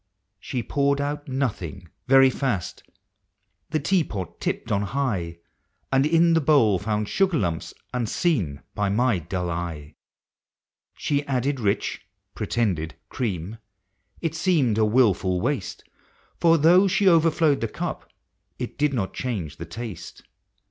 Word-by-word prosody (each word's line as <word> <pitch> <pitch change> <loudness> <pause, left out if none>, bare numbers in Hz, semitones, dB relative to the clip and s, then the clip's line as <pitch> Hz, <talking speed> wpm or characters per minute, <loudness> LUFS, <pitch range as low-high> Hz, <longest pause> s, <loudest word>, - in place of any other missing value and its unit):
She 125 -2 -4
poured 140 +4 +1
out 145 +1 -3
nothing, 105 - -3 0.2
very 135 0 +6
fast 125 - -2 0.5
— - - -50
the 155 - 0
tea 175 +4 +2
pot 95 - -6
tipped - - -2
on 100 - +2
high, 100 -7 -2 0.3
— - - -47
And 135 +2 +4
in 165 +1 +4
the 165 - +3
bowl 135 - +4
found 105 0 -1
sugar 190 - +2
lumps 85 - -2 0.2
unseen 115 - -1
by 105 -1 0
my 115 -1 +2
dull 90 +2 -3 0.2
eve. 75 -1 -11 1.0
She 145 -1 0
added 135 +1 0
rich 100 -3 -1 0.3
(pretended) 90 -9 -1
cream 105 -2 -3 0.3
— 95 - -35
it 165 - 0
seemed 155 - +2
a 110 - +4
wilful 105 -6 +2
waste, 120 -3 -2 0.6
For 165 -1 +5
though 175 +6 +6
she 195 +1 +2
overflowed 165 -4 +4
the 115 - 0
cup, - - -5 0.5
it - - -6
did 145 -2 +2
not 95 -6 -2
change 100 - -4
the 85 - -6
taste. 105 +2 -8
125 Hz, 140 wpm, -24 LUFS, 95-145 Hz, 1.0 s, very